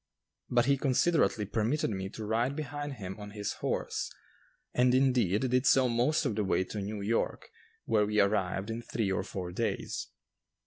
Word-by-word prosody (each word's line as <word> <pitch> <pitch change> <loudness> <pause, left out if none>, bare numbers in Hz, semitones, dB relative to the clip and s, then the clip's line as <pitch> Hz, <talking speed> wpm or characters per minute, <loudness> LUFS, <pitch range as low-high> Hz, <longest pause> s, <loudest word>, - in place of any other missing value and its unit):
But 120 -1 +3
he 140 +1 +3
considerately 135 -4 +2
permitted 115 +6 0
me 95 -1 -3
to 110 +1 -7
ride 120 +5 0
behind 145 -1 -4
him 95 -5 -7
on 105 0 -7
his 105 - -2
horse; - - -2 0.6
and, 125 0 +4
indeed, 125 -4 +3
did 125 +2 +3
so 130 -1 +5
most 125 +7 +2
of - - +1
the 105 0 0
way 95 -1 +1
to 100 +2 -5
New 105 +1 -4
York, 110 +3 -1 0.3
where 105 -2 +2
we 105 0 +1
arrived 100 0 +1
in 115 +1 -4
three 110 -3 -2
or 95 - 0
four 95 -2 -5
days. - - -2
110 Hz, 175 wpm, -30 LUFS, 100-130 Hz, 0.6 s, so